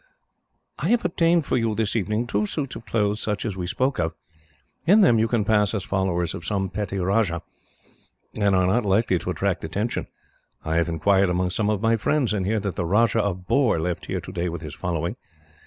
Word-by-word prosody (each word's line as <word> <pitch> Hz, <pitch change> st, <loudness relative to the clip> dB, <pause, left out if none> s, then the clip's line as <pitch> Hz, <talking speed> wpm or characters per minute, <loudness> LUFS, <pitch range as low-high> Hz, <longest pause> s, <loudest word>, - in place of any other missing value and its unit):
"I -, -, -1 dB
have 240 Hz, -4 st, +2 dB
obtained 170 Hz, -2 st, +2 dB
for -, -, 0 dB
you, 115 Hz, -3 st, 0 dB
this 110 Hz, -1 st, -1 dB
evening, 110 Hz, +2 st, 0 dB
two 105 Hz, -2 st, 0 dB
suits 140 Hz, 0 st, -4 dB
of 115 Hz, -, -10 dB
clothes 105 Hz, -1 st, 0 dB
such 105 Hz, +1 st, -2 dB
as 105 Hz, -4 st, -2 dB
we 90 Hz, -2 st, -4 dB
spoke 130 Hz, +8 st, 0 dB
of. 80 Hz, -1 st, 0 dB, 0.7 s
In 205 Hz, +5 st, +7 dB
them 120 Hz, -, +5 dB
you 110 Hz, -, +3 dB
can 115 Hz, -3 st, 0 dB
pass 105 Hz, 0 st, +2 dB
as 100 Hz, -, -2 dB
followers 90 Hz, -3 st, -1 dB
of -, -, -7 dB
some 95 Hz, +1 st, -2 dB
petty 100 Hz, -1 st, -3 dB
rajah, 95 Hz, -2 st, +1 dB, 0.9 s
and 100 Hz, -2 st, +2 dB
are 95 Hz, 0 st, +3 dB
not 110 Hz, +7 st, +2 dB
likely 100 Hz, -2 st, +2 dB
to -, -, -5 dB
attract 90 Hz, +1 st, -1 dB
attention. 100 Hz, +8 st, -2 dB, 0.6 s
I 80 Hz, +1 st, 0 dB
have 85 Hz, 0 st, +1 dB
inquired 95 Hz, +4 st, +2 dB
among 90 Hz, +1 st, 0 dB
some 105 Hz, +3 st, 0 dB
of 105 Hz, 0 st, -1 dB
my 115 Hz, 0 st, +3 dB
friends, 130 Hz, +2 st, +1 dB
and 95 Hz, -3 st, -1 dB
hear 110 Hz, +1 st, +1 dB
that 100 Hz, -4 st, -4 dB
the 85 Hz, -, -1 dB
Rajah 110 Hz, +5 st, +3 dB
of 95 Hz, -3 st, -3 dB
Bohr 130 Hz, -, +3 dB
left 85 Hz, +1 st, -3 dB
here -, -, -2 dB
today 85 Hz, +1 st, -3 dB
with 85 Hz, -1 st, -6 dB
his 75 Hz, -2 st, -7 dB
following. 85 Hz, +4 st, -3 dB
100 Hz, 210 wpm, -24 LUFS, 90-115 Hz, 0.9 s, In